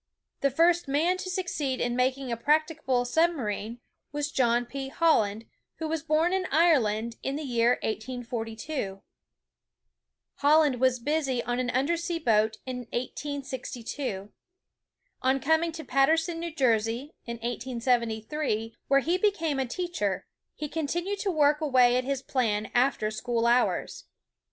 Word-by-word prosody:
The 275 - +2
first 335 +4 +3
man 320 +7 +2
to 370 0 -5
succeed 335 -8 -2
in 240 0 0
making 255 +1 0
a - - 0
practicable 295 -1 +1
sub 330 +7 +3
marine 230 -3 -4 0.3
was 295 0 -2
John 240 -1 +2
P. 270 +2 -5
Holland, 230 -9 +2 0.3
who 320 - -4
was 320 0 -2
born 320 +4 +2
in 380 -1 0
Ireland 235 -9 +3
in 270 - -2
the 305 - -4
year 240 -2 +3
1842. 225 -1 -4 1.3
Holland 295 -3 +4
was 260 -1 +4
busy 270 -1 -1
on 245 0 -2
an 250 -1 -1
under 270 +7 +1
sea 340 0 -2
boat 220 -7 +2
in 255 -1 -4
1862. 255 -5 -4 0.9
On 265 +1 +2
coming 320 +4 +2
to 320 0 -7
Paterson, 320 +6 +2
New 340 0 -4
Jersey, 240 0 0
in 235 - -3
1873, 235 0 -1
where 275 0 +4
he 345 +6 0
be 420 - +5
came 325 -8 -2
a 265 - 0
teacher, 240 - -2 0.3
he 300 - -4
continued 340 +6 -2
to 400 - -1
work 300 -3 +3
away 255 -5 +4
at 255 - -1
his 275 -1 -2
plan 220 -5 -1
after 240 -4 +2
school 230 +1 -1
hours. 240 +1 +1
265 Hz, 145 wpm, -28 LUFS, 235-315 Hz, 1.3 s, be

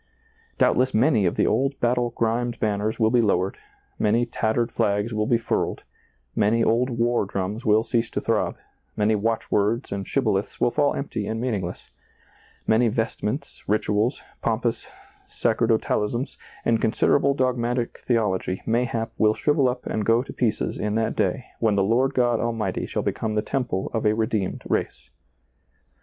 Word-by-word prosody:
Doubtless 130 0 +3
many 110 - +3
of - - -1
the - - +2
old 135 +5 +1
battle 120 0 +1
grimed 120 +1 -1
banners 105 +1 -1
will 110 -1 +3
be 120 -1 +4
lowered, 95 -3 0 0.4
many 115 +3 +2
tattered 115 +1 -1
flags 105 +3 0
will 105 0 0
be 120 - +4
furled, 115 - -2 0.5
many 110 +2 +3
old 120 +4 +2
war 120 -1 +1
drums 100 +4 -4
will 110 +1 +4
cease 115 -1 0
to - - -2
throb, - - 0 0.4
many 105 +1 +3
watch 110 +2 -1
words 110 +5 +1
and 100 -1 -4
shibboleths 105 -7 0
will - - +2
fall 145 +1 +2
empty 115 -7 -3
and 110 0 -2
mean 125 0 -1
ingless, 90 0 -7 0.7
many 115 +2 +3
vestments, 115 +4 -3
rituals, 105 +3 +1 0.2
pompous - - -1 0.4
sacerdo 115 0 +1
talisms, 120 +6 -2 0.3
and 115 -1 +2
considerable 140 +5 +2
dogmatic 125 -2 -1
theology, 100 -6 -1
may 120 +2 +2
hap, 115 -1 -3
will 110 0 +4
shrivel 145 -3 +2
up 125 0 -5
and 110 - -2
go 115 +3 +3
to - - -9
pieces 110 -4 -1
in 105 0 -1
that 110 0 0
day 130 -2 0
when 110 -3 +2
the 100 - +3
Lord 125 +7 +2
God 120 -2 +2
Almighty 115 -2 -2
shall - - -2
become 110 -1 -2
the 105 - +1
temple 125 -9 -2
of 110 -2 +1
a 105 - +3
redeemed 110 -3 -1
race. - - -2
115 Hz, 165 wpm, -24 LUFS, 105-120 Hz, 0.7 s, be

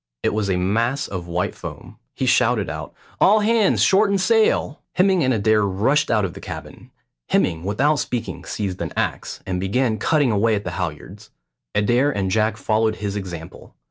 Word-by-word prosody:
It - - +1
was 105 -2 -1
a 95 - +1
mass 115 +10 0
of 90 -3 -6
white 85 +1 -2
foam. - - -10 0.2
He - - -1
shouted - - +2
out, - - -6 0.3
"All 210 +3 +5
hands 220 -1 +3
shorten 200 0 +4
sail!" 195 - +2
Hemming 185 -2 +3
and 130 - +2
Adair 110 -1 +2
rushed 110 +10 +1
out 110 -4 +2
of 90 - -5
the - - -10
cabin. - - -9 0.4
Hemming 85 -2 +1
without 135 +10 +1
speaking 120 -2 -4
seized 95 -4 -4
an - - -3
axe, - - -2
and 90 -1 -2
began 110 +4 0
cutting 145 -6 +2
away 110 +1 +2
at 100 - -3
the - - -4
halyards; 85 -5 -6 0.5
Adair 120 +7 +3
and 100 -8 -1
Jack 110 +2 +1
followed 110 0 +1
his 100 -2 -4
example. 85 -5 -8
110 Hz, 175 wpm, -21 LUFS, 95-145 Hz, 0.5 s, All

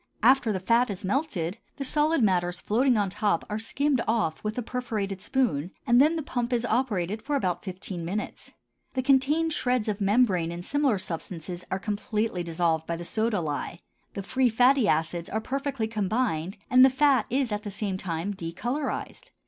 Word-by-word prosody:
After 250 -1 +5
the 190 - -1
fat 230 +6 +2
is 195 -2 -5
melted, 205 - -1 0.2
the 275 - -3
solid 300 0 +2
matters 180 -3 +1
floating 245 +5 +2
on 200 -2 0
top 205 -4 0
are 210 - -1
skimmed 275 +3 0
off 215 -8 0
with 215 +2 -3
a 245 - -1
perforated 215 -6 -3
spoon, 230 - 0 0.2
and 240 +2 +5
then 310 +3 +4
the 320 - -2
pump 245 -3 -2
is 240 -1 +1
operated 215 -5 0
for 290 +4 -2
about 185 -10 -1
fifteen 185 -2 -5
minutes. 195 +6 -5 0.4
The 260 - 0
contained 285 +5 +3
shreds 250 -5 0
of 210 -1 -2
membrane 195 -5 +2
and 175 +1 -7
similar 285 -5 +2
substances 175 0 -6
are 190 - -1
completely 210 -1 -2
dissolved 165 -1 0
by 170 - -1
the 170 +1 -7
soda 220 0 0
lye, 155 +2 -4 0.4
the 200 - -4
free 255 +4 +2
fatty 245 +1 +4
acids 165 +1 0
are 220 - -1
perfectly 275 -1 -2
combined, 205 -5 -1
and 255 0 +6
the 265 - +8
fat 265 -3 +3
is 260 -1 0
at 210 0 -1
the 210 - -6
same 195 -1 -3
time 175 +3 -3
decolorized. 245 - -4
215 Hz, 180 wpm, -27 LUFS, 185-255 Hz, 0.4 s, the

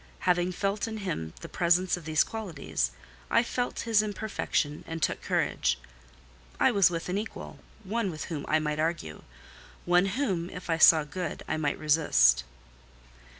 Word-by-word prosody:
Having 180 0 +1
felt 200 +4 -1
in 220 -1 -5
him 80 - -4
the - - -7
presence 180 +1 +2
of 175 -3 -10
these 155 -1 +3
qualities, 170 - -3 0.4
I 230 - +4
felt 245 0 -2
his 225 -2 +3
imperfection 205 -8 -2
and 165 0 -4
took - - 0
courage. - - 0 0.8
I - - +5
was 200 -5 +5
with 165 -1 -4
an 185 +3 -1
equal—one 220 0 -5
with 155 -3 -5
whom 150 -4 -5
I 155 - +3
might 150 -1 -2
argue—one 160 - -2
whom, 190 -6 -1
if 180 -2 -6
I 165 - +1
saw 160 -1 +8
good, 165 +2 -5
I 160 - -1
might 145 -2 -1
resist. 65 - +4
175 Hz, 150 wpm, -28 LUFS, 155-200 Hz, 0.8 s, saw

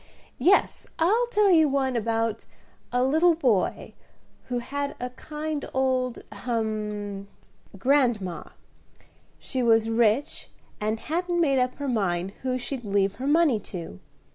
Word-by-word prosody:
Yes, 390 +3 +2
I'll 430 +9 +2
tell 420 -4 +3
you 320 -4 +5
one 265 -2 0
about 225 -1 -1 0.5
a 245 +1 +2
little 320 +6 +4
boy 245 - 0 0.5
who 250 - -3
had 280 +4 -3
a 250 0 -4
kind 300 +2 -5
old 255 -2 0
ahem! 210 -4 -3 0.5
grandma. 235 -7 +1 0.9
She 260 - -3
was 225 -1 +3
rich, 230 +4 +1 0.3
and 215 +1 -1
hadn't 345 +4 -1
made 275 -5 +3
up 250 0 0
her 285 - -5
mind 190 -6 0
who 255 -1 -1
she'd 255 0 -5
leave 200 -1 0
her 260 +3 -4
money 295 -6 +4
to. 170 - -8
250 Hz, 130 wpm, -26 LUFS, 215-290 Hz, 0.9 s, you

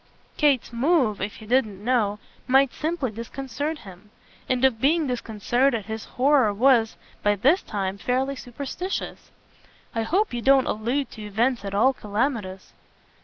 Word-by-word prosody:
Kate's 280 -5 +2
move, 250 - +2
if 200 +1 -3
he 220 - -12
didn't 215 -4 0
know, 220 -5 +1 0.3
might 270 0 +4
simply 310 -6 -2
disconcert 270 +6 -5
him; 195 -3 -14 0.4
and 255 0 +2
of 230 -4 +1
being 315 +3 +3
disconcerted 240 -1 0
his 220 0 -6
horror 260 -4 +4
was 230 +1 +3 0.2
by 205 0 +2
this 275 - +3
time 195 -1 -4
fairly 265 +4 0
superstitious. 280 +9 -5 0.6
"I 225 - -1
hope 370 - 0
you 240 - -2
don't 270 +1 +5
allude 240 +5 -1
to 220 - -10
events 225 +3 0
at 200 0 -4
all 255 +6 +4
calamitous." 210 -4 -3
245 Hz, 145 wpm, -24 LUFS, 215-275 Hz, 0.6 s, don't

